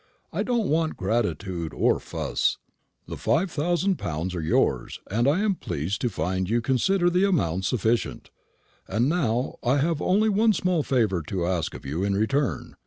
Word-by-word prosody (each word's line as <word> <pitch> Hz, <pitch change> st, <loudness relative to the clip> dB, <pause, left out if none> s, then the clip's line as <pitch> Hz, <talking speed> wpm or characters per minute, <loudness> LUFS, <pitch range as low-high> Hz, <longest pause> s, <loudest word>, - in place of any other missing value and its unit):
I -, -, -1 dB
don't 235 Hz, -5 st, 0 dB
want 160 Hz, +1 st, 0 dB
gratitude 95 Hz, -5 st, -2 dB
or -, -, +2 dB
fuss. -, -, -1 dB, 0.5 s
The -, -, -6 dB
five 175 Hz, +2 st, +1 dB
thousand 175 Hz, +5 st, 0 dB
pounds 80 Hz, +4 st, -3 dB
are 90 Hz, -, -3 dB
yours, 80 Hz, -, 0 dB
and 115 Hz, +5 st, +2 dB
I 155 Hz, +8 st, +3 dB
am 210 Hz, -2 st, +2 dB
pleased 85 Hz, -, -3 dB
to 125 Hz, -, +1 dB
find 95 Hz, 0 st, -2 dB
you 115 Hz, +2 st, +2 dB
consider 175 Hz, +10 st, +2 dB
the 180 Hz, +2 st, +3 dB
amount 95 Hz, -, 0 dB
sufficient. 115 Hz, +1 st, -1 dB, 0.6 s
And 110 Hz, +6 st, +1 dB
now 135 Hz, -7 st, 0 dB
I 130 Hz, +3 st, +2 dB
have 155 Hz, +2 st, 0 dB
only 205 Hz, +4 st, +3 dB
one 215 Hz, +1 st, +3 dB
small 180 Hz, -3 st, +1 dB
favour 110 Hz, -, +1 dB
to 90 Hz, -3 st, -2 dB
ask 85 Hz, -3 st, -1 dB
of -, -, -10 dB
you 75 Hz, +7 st, -2 dB
in 100 Hz, 0 st, +1 dB
return." 130 Hz, +7 st, 0 dB
120 Hz, 175 wpm, -25 LUFS, -, 0.6 s, I